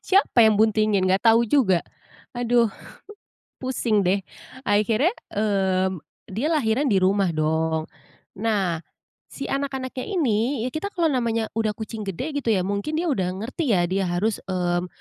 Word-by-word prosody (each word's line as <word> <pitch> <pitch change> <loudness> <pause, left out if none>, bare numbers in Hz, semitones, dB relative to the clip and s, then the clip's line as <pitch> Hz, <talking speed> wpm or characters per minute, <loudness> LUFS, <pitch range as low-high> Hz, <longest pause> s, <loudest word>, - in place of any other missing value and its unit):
Siapa 380 - +4
yang 220 -2 +5
buntingin? 215 -3 +3
Nggak 190 +1 +2
tau 230 +1 +5
juga. 210 -8 +3 0.6
Aduh, 240 -1 +2 0.9
pusing 240 -5 0
deh. 195 +2 +3 0.4
Akhirnya, 220 - +2 0.2
mmm, 190 -3 +1 0.3
dia 230 +10 -1
lahiran 280 -3 +1
di 205 - +3
rumah 195 -1 +3
dong. 160 +1 0 0.5
Nah, 200 -7 0 0.5
si 275 - -7
anak-anaknya 265 -2 -3
ini, 255 - 0
ya - - -2
kita 315 +6 -3
kalau 340 -3 +2
namanya 230 -3 0
udah 220 -1 +1
kucing 220 0 -6
gede 275 - -3
gitu 240 - -2
ya, 185 -3 +1
mungkin 200 +10 -2
dia 335 +3 0
udah 185 -5 -1
ngerti 265 0 -1
ya, 175 - +2
dia 190 0 0
harus, 190 +5 0
mmm, 180 -1 -1
215 Hz, 150 wpm, -24 LUFS, 190-255 Hz, 0.9 s, yang